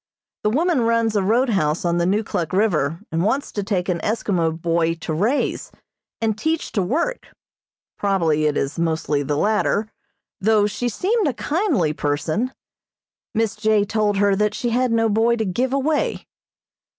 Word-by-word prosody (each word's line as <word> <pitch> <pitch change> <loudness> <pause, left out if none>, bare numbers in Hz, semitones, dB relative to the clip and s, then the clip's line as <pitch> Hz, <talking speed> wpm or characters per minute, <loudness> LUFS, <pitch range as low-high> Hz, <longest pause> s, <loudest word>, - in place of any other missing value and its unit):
The 210 - +1
woman 310 +4 +2
runs 230 -1 +1
a 205 - +3
roadhouse 195 - +1
on 170 0 +1
the 170 - +1
Neukluk 190 -5 -1
River, 170 -5 +1
and 165 +1 0
wants 265 +9 0
to 205 - -2
take 195 -3 -1
an 180 -2 0
Eskimo 170 -7 -1
boy 165 0 +1
to 165 -1 -5
raise, 215 - 0 0.5
and 220 -2 0
teach 315 +8 -2
to 205 - 0
work 330 - -1 0.7
probably 165 -7 +1
it 150 - 0
is 140 +5 -2
mostly 160 -3 0
the 145 +1 -1
latter, 215 +2 +1 0.5
though 215 0 +3
she 210 +4 -2
seemed 400 - 0
a 275 - 0
kindly 295 - 0
person. 155 - -1 0.8
Miss 225 0 0
J. 215 -1 +2
told 210 -1 0
her 200 0 +3
that 210 +1 0
she 240 -4 -2
had 250 +1 +1
no 225 0 +3
boy 225 +2 +2
to 220 -2 -1
give 245 +8 -1
away. 285 +3 0
210 Hz, 160 wpm, -21 LUFS, 170-230 Hz, 0.8 s, a